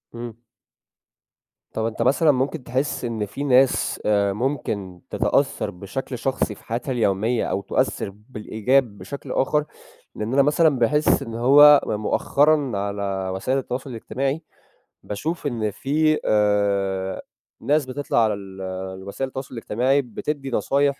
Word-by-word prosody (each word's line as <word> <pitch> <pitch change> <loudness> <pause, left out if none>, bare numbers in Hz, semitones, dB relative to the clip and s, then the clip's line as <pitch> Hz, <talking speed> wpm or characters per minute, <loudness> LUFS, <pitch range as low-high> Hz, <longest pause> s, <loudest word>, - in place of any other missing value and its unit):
إمم. 115 -1 -7 1.4
طَب 110 - -1
أنت 115 -1 -3
مثلًا 155 +2 +4
ممكن 135 +2 -1
تحس 130 +1 -2
إن 115 -3 -2
في 120 +8 -6
ناس 135 -1 +3
آآ 100 -2 +2
ممكن 105 -7 -3
تتأثّر - - 0
بشكل 125 +8 -6
شخصي 125 -3 -1
في - - -18
حياتها 120 +4 -3
اليومية 115 0 +1
أو 100 - -1
تؤثّر 100 - -1 0.2
بالإيجاب 110 +1 0
بشكل 100 +9 -8
آخَر، 150 +3 +1 0.5
لإن 105 +3 -3
أنا 140 - +5
مثلًا 150 +3 +4
باحس 150 +6 +3
إن 115 - -6
هو 145 +5 +7
م - - -1
مؤخرًا 140 +7 +2
على 100 -1 -2
وسائل 130 +8 0
التواصل 130 0 -4
الاجتماعي 135 +5 -3 0.6
باشوف 155 +10 -3
إن 115 -5 -1
في 155 +8 +1
آآ 100 -2 +1 0.4
ناس 150 0 +2
بتطلع 130 -2 0
على 110 -1 +2
ال 95 -1 -9 0.4
الوسائل 100 +8 -4
التواصل 130 0 -7
الاجتماعي 125 +5 +1
بتدّي 135 +3 -5
نصايح 140 +2 +1
125 Hz, 135 wpm, -23 LUFS, 105-140 Hz, 1.4 s, هو